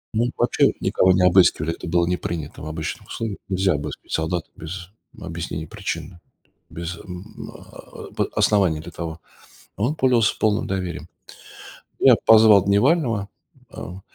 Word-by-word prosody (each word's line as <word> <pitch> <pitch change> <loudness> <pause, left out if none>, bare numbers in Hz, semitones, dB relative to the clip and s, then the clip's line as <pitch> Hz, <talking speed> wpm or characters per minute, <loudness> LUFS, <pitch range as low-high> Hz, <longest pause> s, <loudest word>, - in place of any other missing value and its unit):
Ну, 120 +2 +2
вообще - - +3
никого 95 - +3
не 90 0 +3
обыскивали, 90 -3 +4
это - - -9
было 85 +1 +2
не 90 +1 0
принято 80 -3 -5
в 75 - -7
обычных 80 0 -5
условиях. 110 -3 -5
Нельзя 95 -1 +2
обыскивать 70 - -6
солдат 80 +1 -1
без 90 +3 -8 0.3
объяснения 80 -1 -5
причины, 90 - -6 0.5
без 85 +1 -6
м, 90 +4 -10
а, - - -13 0.5
а, - - -19
п - - 0
оснований 95 -7 +2
для 80 +3 -9
того. 80 0 -6 0.5
А - - -8
он 145 +6 +1
пользовался 125 -5 +2
полным 110 0 +1
доверием. 95 -2 -4 0.9
Ну, - - +4
я - - +9
позвал 110 -3 +7
дневального, 115 - +2 0.4
а, 90 +2 -9
90 Hz, 155 wpm, -22 LUFS, 85-105 Hz, 0.9 s, я